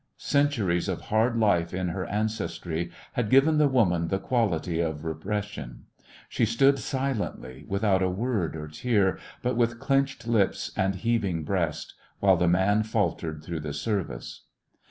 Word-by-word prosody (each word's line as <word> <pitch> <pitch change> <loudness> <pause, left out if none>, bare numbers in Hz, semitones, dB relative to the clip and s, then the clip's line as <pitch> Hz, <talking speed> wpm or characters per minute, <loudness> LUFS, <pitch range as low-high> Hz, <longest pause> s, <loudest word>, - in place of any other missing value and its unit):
Cen 145 0 +2
turies 95 -11 -1
of - - -2
hard 115 +2 +1
life 90 -6 +2
in 90 -1 -1
her 90 +2 -3
ancestry 85 -6 -2 0.2
had 120 -4 -1
given 150 +4 +5
the 150 - +5
woman 90 -11 +2
the 95 - 0
quality 95 -8 0
of 80 -2 -2
re 80 - -1
pression. 100 -7 -5 0.4
She - - -1
stood 135 +5 +4
silently, 110 - -3
without 100 -1 +1
a 95 - +2
word 100 -4 -1
or 75 -1 -6
tear, 100 +4 +1 0.2
but 125 0 0
with 120 0 +1
clenched 135 -2 0
lips 110 -4 +1
and 95 0 +1
heaving 95 -5 0
breast, 85 -2 -2 0.3
while 95 -2 +5
the 90 +1 +1
man 95 +5 +3
faltered 80 -7 -1
through 85 0 -4
the 75 -1 -5
service. 75 - -4
100 Hz, 155 wpm, -27 LUFS, 85-115 Hz, 0.4 s, given